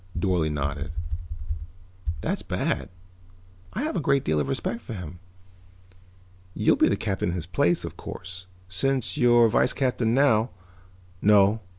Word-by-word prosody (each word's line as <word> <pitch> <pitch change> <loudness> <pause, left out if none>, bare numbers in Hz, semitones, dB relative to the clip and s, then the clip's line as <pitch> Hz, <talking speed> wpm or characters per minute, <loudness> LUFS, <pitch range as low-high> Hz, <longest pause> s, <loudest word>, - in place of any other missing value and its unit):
Dorle 85 -3 +1
nodded. 70 +2 -3 1.3
"That's - - -1
bad. - - -2 0.8
I 250 - -2
have 305 - -2
a - - +1
great 140 -3 +2
deal 75 0 +1
of 70 - 0
respect 115 +11 -2
for 115 - -7
him. 90 -2 -7 1.4
You - - +4
will - - +4
be - - +2
captain 95 -2 -1
in 85 - -2
his 85 -3 -4
place, 85 -1 +2
of - - -8
course. 95 0 -8 0.2
Since 130 +8 0
you're 120 -1 +6
vice 115 - +3
captain 125 -3 +1
now 130 -4 +4 0.4
" 90 0 -27
"No. 105 +1 +5
95 Hz, 150 wpm, -26 LUFS, 85-120 Hz, 1.4 s, you're